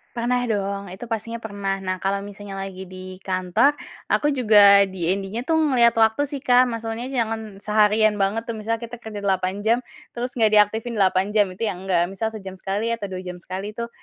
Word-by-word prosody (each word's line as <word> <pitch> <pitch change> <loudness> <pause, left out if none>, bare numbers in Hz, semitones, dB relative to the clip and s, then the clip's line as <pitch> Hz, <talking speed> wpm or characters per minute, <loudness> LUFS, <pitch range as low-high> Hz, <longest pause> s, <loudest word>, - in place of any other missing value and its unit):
Pernah 245 +1 0
dong, 200 -3 -2
itu 230 +5 -9
pastinya 230 +1 -4
pernah. 200 -3 -3
Nah 185 0 -2
kalau 195 +2 -1
misalnya 205 0 -9
lagi 195 -1 -6
di 185 0 -9
kantor 185 +9 +2 0.4
aku 295 - +2
juga 210 -6 +6
DND-nya 190 +1 -2
tuh 320 +6 +1
ngeliat 260 -7 +4
waktu 220 +3 +3
sih, 285 - -3
Kak, 250 -1 +4
maksudnya 230 +1 -4
jangan 225 -5 -3
seharian 210 +1 +3
banget 210 +4 0
tuh 230 - -4
misalnya 220 +1 -2
kita 235 0 -10
kerja 210 -3 -7
8 190 +1 -1
jam 235 +3 +3 0.3
terus 245 +1 -4
gak 220 -2 +3
diaktifin 220 +3 +3
8 190 +2 +2
jam 205 -3 +3
itu 185 +5 -4
ya 215 - -1
enggak. 180 -1 0
Misal 220 +3 -2
sejam 195 -4 -8
sekali 200 +5 -2
atau 210 -4 -5
2 185 0 -6
jam 180 -1 -7
sekali 190 +4 -6
tuh 235 +1 -5
210 Hz, 190 wpm, -23 LUFS, 195-230 Hz, 0.4 s, juga